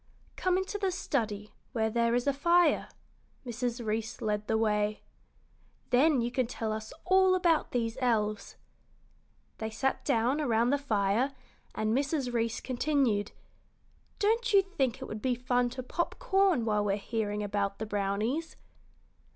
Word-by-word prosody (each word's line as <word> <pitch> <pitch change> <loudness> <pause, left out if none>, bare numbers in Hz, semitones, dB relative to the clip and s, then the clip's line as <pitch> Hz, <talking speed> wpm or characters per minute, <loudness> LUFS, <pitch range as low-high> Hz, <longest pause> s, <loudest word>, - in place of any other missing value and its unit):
"Come 370 -1 +1
into 380 +2 -3
the 390 -1 +1
study, 215 - -2 0.2
where 220 -2 0
there 235 +1 +2
is 245 - 0
a 280 - +2
fire." 340 +5 +3 0.6
Mrs. 240 0 -3
Reece 220 +1 -2
led 210 -1 -2
the 220 - +2
way. 210 -1 0 0.9
"Then 270 +1 +4
you 235 +1 -1
can 250 -1 0
tell 225 -2 -3
us 220 0 -6
all 375 0 +5
about 340 -4 +2
these 230 -2 -2
elves." 215 -4 0 1.0
They 220 - -3
sat 265 +5 -1
down 245 +6 +1
around 235 -3 +2
the 285 - +2
fire, 225 +1 +1 0.4
and 215 +1 0
Mrs. 275 -2 -1
Reece 230 -1 -1
continued, 255 -5 0 0.9
"Don't 460 +4 +1
you 395 -1 +7
think 275 - -2
it - - -5
would 215 0 -6
be 255 +1 +1
fun 245 0 +1
to 255 +1 -6
pop 340 +7 -2
corn 390 - +2
while 210 -2 +1
we're 200 -1 +1
hearing 210 -1 -2
about 200 -1 -1
the 220 - -4
brownies?" 210 +10 -2
240 Hz, 150 wpm, -30 LUFS, 215-285 Hz, 1.0 s, you